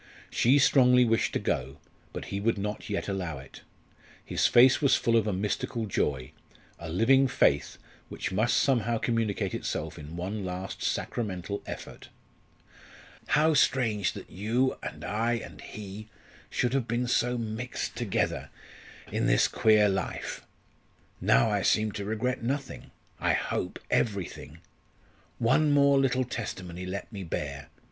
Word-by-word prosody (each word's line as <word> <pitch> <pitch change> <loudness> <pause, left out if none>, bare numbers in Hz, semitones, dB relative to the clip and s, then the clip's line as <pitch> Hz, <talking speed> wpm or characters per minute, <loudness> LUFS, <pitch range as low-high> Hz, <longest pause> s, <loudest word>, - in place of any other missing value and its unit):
She 130 +4 +4
strongly 125 -3 +5
wished 115 -1 +1
to - - +2
go; 65 +4 -2 0.3
but - - -6
he 100 - -1
would 115 +2 +1
not 105 +2 -4
yet 100 - -2
allow 90 -6 -3
it. 65 0 -12 0.6
His - - +2
face 125 +2 +6
was 140 - +5
full 115 - +1
of 110 -2 +3
a - - +1
mystical 110 +5 -2
joy 70 -9 -1 0.5
a 85 - -7
living 130 +10 +4
faith, - - +2 0.3
which - - -4
must 110 +5 +2
somehow 120 -4 +2
communicate 115 -3 -1
itself - - -4
in 75 +3 -8
one 100 +4 -4
last 90 +1 -5
sacramental 100 -3 -3
effort. - - -8 1.2
"How 155 +2 +3
strange 115 -8 +2
that - - -10
you 115 +7 0
and - - -7
I 115 +3 0
and 115 - -6
he 105 +1 -8 0.4
should 125 0 0
have 135 -4 0
been 120 +2 0
so 120 0 +1
mixed 115 +2 -4
together - - -1 0.6
in - - 0
this - - +4
queer 110 -1 +4
life. 95 -1 -3 0.8
Now 115 - +4
I 100 -1 +1
seem 110 +2 +2
to 100 -1 -5
regret 120 +5 -1
nothing 135 +3 -4 0.3
I - - +2
hope 90 - -2
everything. 100 -6 -2 0.8
One 140 +7 +3
more 140 -1 +5
little 130 -1 +2
testimony 90 -7 -5
let 100 +3 -6
me 100 -2 -5
bear! 70 -4 -5
110 Hz, 145 wpm, -28 LUFS, 95-125 Hz, 1.2 s, face